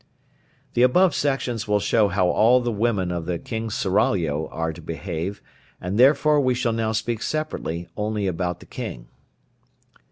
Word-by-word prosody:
The 120 - +2
above 170 +8 +5
sections 125 -6 -1
will 105 0 +2
show 105 +1 +3
how 95 -1 +1
all 115 +7 +4
the 120 -1 -1
women 105 -4 0
of 85 -2 -4
the 90 -1 -1
King's 110 +3 -4
seraglio 85 - +1
are 80 0 -3
to 85 - -11
behave, 85 +4 -5 0.4
and 90 +2 -4
therefore 145 +3 +5
we 130 -2 +2
shall 120 -2 0
now 110 -1 0
speak 110 0 -2
separately 90 - -3
only 105 -1 -2
about 90 -1 -2
the - - -12
king. - - -7
105 Hz, 160 wpm, -23 LUFS, 90-120 Hz, 0.4 s, above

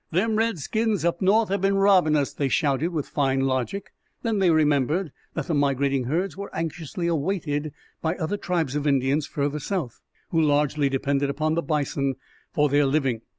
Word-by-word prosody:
"Them 215 +6 +1
redskins 220 -2 0
up 170 0 0
north 210 +3 +3
have 200 -1 0
been 195 0 +2
robbing 195 -6 +4
us!" 145 -2 0
they 140 - -1
shouted, 145 +3 +1
with 160 -5 -3
fine 135 -2 0
logic. 135 +9 -2 0.3
Then 225 -3 0
they 190 -2 +4
remembered 155 +2 +2 0.2
that 165 - -2
the 170 - -2
migrating 140 -2 +1
herds 170 +6 -1
were 200 +1 -6
anxiously 165 +1 -4
awaited 155 -3 -1 0.3
by 160 +1 0
other 185 +3 -2
tribes 165 -8 -1
of 150 0 -1
Indians 140 +2 +1
further 145 +1 -2
south, 155 - -4 0.3
who 165 - +3
largely 145 -1 +2
depended 140 +1 0
upon 155 +3 0
the 170 - +1
bison 140 -3 -1 0.4
for 150 0 +2
their 145 0 +3
living. 135 -5 0
155 Hz, 175 wpm, -25 LUFS, 140-180 Hz, 0.4 s, robbing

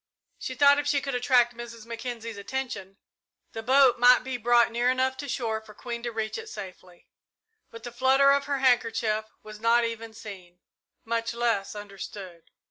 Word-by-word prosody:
She 260 - -5
thought 285 +2 +5
if 290 - -3
she 290 -1 +2
could 275 0 -4
attract 245 -1 +3
Mrs. 235 -1 -9
Mackenzie's 230 -1 -6
attention, 200 -3 -5 0.5
the 225 - -6
boat 260 +1 +4
might 245 +1 +6
be 260 0 -4
brought 240 0 +3
near 240 +2 +1
enough 260 +1 +1
to 285 +1 -6
shore 225 -4 -2
for 215 -1 -15
Queen 235 -1 -6
to 240 0 -4
reach 220 - -3
it 450 -1 -9
safely, 185 - -11 0.6
but 230 0 -12
the 240 - -7
flutter 265 +3 +4
of 280 0 +2
her 280 -1 -1
handkerchief 230 -4 +1 0.2
was 215 0 -11
not 230 +1 +3
even 230 -1 -6
seen, 185 -5 -11 0.5
much 230 0 -2
less 230 -4 -1
understood. 195 -4 -9
235 Hz, 175 wpm, -27 LUFS, 220-255 Hz, 0.6 s, might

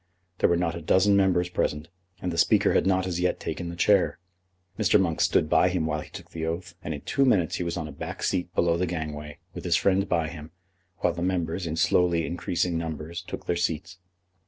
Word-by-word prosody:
There - - +4
were 85 - +3
not 85 -1 0
a 85 - -6
dozen 95 +5 +4
members 95 -3 +3
present, 75 -3 -2 0.4
and 90 - -1
the 85 - -4
Speaker 105 +3 +4
had - - +2
not 95 -1 +2
as 90 -2 -2
yet 90 0 0
taken 85 - -4
the 85 - -6
chair. 100 +2 +3 0.6
Mr. 105 0 +4
Monk 85 -4 0
stood - - +3
by 90 - +4
him 90 -3 -1
while 75 -1 -1
he - - -11
took - - -11
the 80 - -5
oath, 85 +2 -3
and 80 - -3
in 70 - -8
two 140 - +1
minutes 100 - +2
he - - -2
was 85 0 -3
on 80 -2 -3
a - - -8
back - - -6
seat 90 -1 -1
below 85 -1 +2
the 90 +1 0
gangway, 75 -3 -5 0.2
with - - -7
his 85 -1 +2
friend 95 +1 +2
by 85 -2 +1
him, 80 -2 -9 0.5
while 90 - +2
the 85 - -6
members, 90 -1 -1
in 80 - -2
slowly 85 0 +2
increasing 85 -1 -1
numbers, 80 +1 -5
took 90 - -8
their 85 - 0
seats. 85 +1 -2
85 Hz, 230 wpm, -26 LUFS, 80-90 Hz, 0.6 s, There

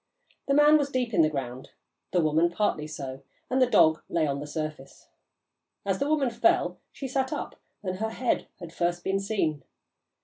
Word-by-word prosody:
The 275 - +3
man 295 +1 +7
was 285 -1 0
deep 250 -4 -1
in 175 - +5
the 155 - +4
ground, 130 -3 -5 0.4
the 180 - +3
woman 160 +2 +3
partly 170 -5 -1
so, 135 -3 -6 0.3
and 260 +1 +2
the 255 - +6
dog 160 -8 +5
lay 165 -2 +1
on 140 -1 -1
the 145 - -6
surface. 155 -3 -6 0.8
As 195 -1 0
the 280 - 0
woman 285 -5 +2
fell, 340 +10 +2
she 275 - -6
sat 265 0 -1
up, - - -4 0.3
and 185 -1 -3
her 220 +2 -1
head 240 +2 -1
had 170 -2 -9
first 175 0 -1
been 195 +1 0
seen. 195 -8 -1
180 Hz, 190 wpm, -27 LUFS, 155-255 Hz, 0.8 s, man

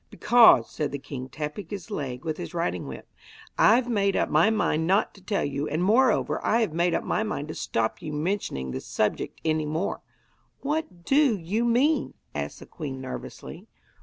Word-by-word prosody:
'Because,' 225 - +6
said 150 - -3
the 140 - -3
king, 130 -2 -7
tapping 150 +6 -5
his 205 +4 -7
leg 135 -7 -4
with 155 -1 -2
his - - -7
riding 90 - -2
whip, 65 - -8 0.5
'I've 240 +3 +5
made 200 -4 +1
up - - +1
my 220 - +4
mind 160 -7 +1
not 195 +3 +2
to 195 - -17
tell 200 +1 0
you, 140 +1 -2
and 160 +4 -1
moreover, 225 +4 +3
I 230 +2 +2
have 215 -9 0
made 170 +1 +2
up - - -1
my - - 0
mind 185 -9 -3
to - - -4
stop 110 0 -2
you 155 - -5
mentioning 150 - -2
the - - -4
subject - - -2
any 155 -1 +1
more.' 160 +6 -2 0.6
'What 290 - -3
do 275 -4 +4
you 200 +7 -1
mean?' 260 +7 +2 0.2
asked - - -4
the - - -9
queen 140 -5 -6
nervously. 130 0 -8
170 Hz, 190 wpm, -26 LUFS, 150-220 Hz, 0.6 s, Because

